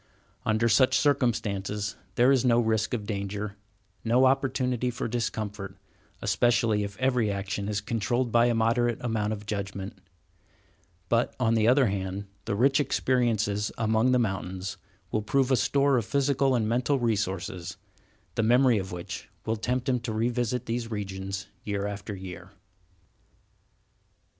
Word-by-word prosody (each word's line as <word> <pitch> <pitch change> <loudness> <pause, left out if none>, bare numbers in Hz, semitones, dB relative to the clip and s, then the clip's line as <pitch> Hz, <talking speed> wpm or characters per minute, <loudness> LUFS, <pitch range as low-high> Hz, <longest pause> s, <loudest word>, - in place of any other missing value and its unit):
Under 110 +1 +2
such 130 +2 +4
circumstances 105 -7 0 0.2
there 125 +3 +5
is 130 -3 +3
no 120 -2 +4
risk 110 +1 +1
of 105 -4 -5
danger, 100 0 -4 0.5
no 120 +3 +4
opportunity 130 -2 +1
for 120 - -3
discomfort, 105 -4 -3 0.5
especially 110 +1 +2
if 100 0 -6
every 125 -4 +2
action 100 0 -3
is 105 -1 -1
controlled 120 +2 -1
by 120 +1 +5
a 120 - +2
moderate 115 +1 +2
amount 110 -3 -1
of 105 -1 -5
judgment; 100 -1 -5 1.1
but, 115 +3 +1
on 115 -2 +2
the 110 -1 +3
other 130 +2 +5
hand, 95 0 -2 0.2
the - - -1
rich 135 +6 +3
experiences 115 -7 +1
among 110 +2 +2
the 125 - +4
mountains 95 -4 -2 0.3
will 110 - 0
prove 135 +5 +1
a - - +6
store 140 +2 +3
of 120 - +1
physical 140 0 +2
and 110 -3 +1
mental 125 +5 +1
resources, 95 -7 -2 0.6
the 115 - 0
memory 120 0 +4
of 95 -1 -5
which 90 -1 -6 0.2
will 110 - 0
tempt 125 +4 -2
him 125 -2 +2
to 115 -1 -4
revisit 120 +2 -1
these 115 0 -3
regions 95 -2 -4 0.2
year 100 -1 -2
after 105 0 -5
year. 95 -1 -9
110 Hz, 145 wpm, -27 LUFS, 100-125 Hz, 1.1 s, a